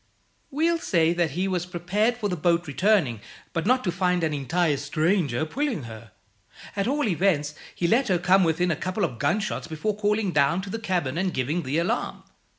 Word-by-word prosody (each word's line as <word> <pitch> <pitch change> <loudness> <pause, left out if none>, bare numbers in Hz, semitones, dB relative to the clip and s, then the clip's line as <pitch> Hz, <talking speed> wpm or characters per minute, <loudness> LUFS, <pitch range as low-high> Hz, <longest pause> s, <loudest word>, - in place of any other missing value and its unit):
We'll 330 +4 +1
say 170 - +2
that 175 -2 +1
he 190 +2 +1
was 180 -2 -2
prepared 195 +7 0
for 215 -4 -1
the 180 - -2
boat 170 +1 +1
returning, 150 - +1 0.3
but 165 +3 -1
not 255 +1 +3
to 180 - 0
find 180 0 0
an 155 -1 0
entire 150 +2 0
stranger 155 -1 0
pulling 260 - -2
her. 110 -1 -10 0.7
At 200 +1 0
all 285 -1 +1
events, 165 -6 +1 0.2
he 170 - 0
let 245 +9 +3
her 185 - +2
come 190 +2 +4
within 175 +2 +1
a - - +1
couple 185 +6 -3
of 120 -8 -6
gunshots 210 - -1
before 200 +7 -2
calling 210 -1 0
down 150 +4 +2
to 195 - -7
the 225 - -3
cabin 175 -9 -1
and 185 0 0
giving 145 +6 -1
the 140 0 -2
alarm. 195 +9 -1
180 Hz, 195 wpm, -25 LUFS, 155-205 Hz, 0.7 s, come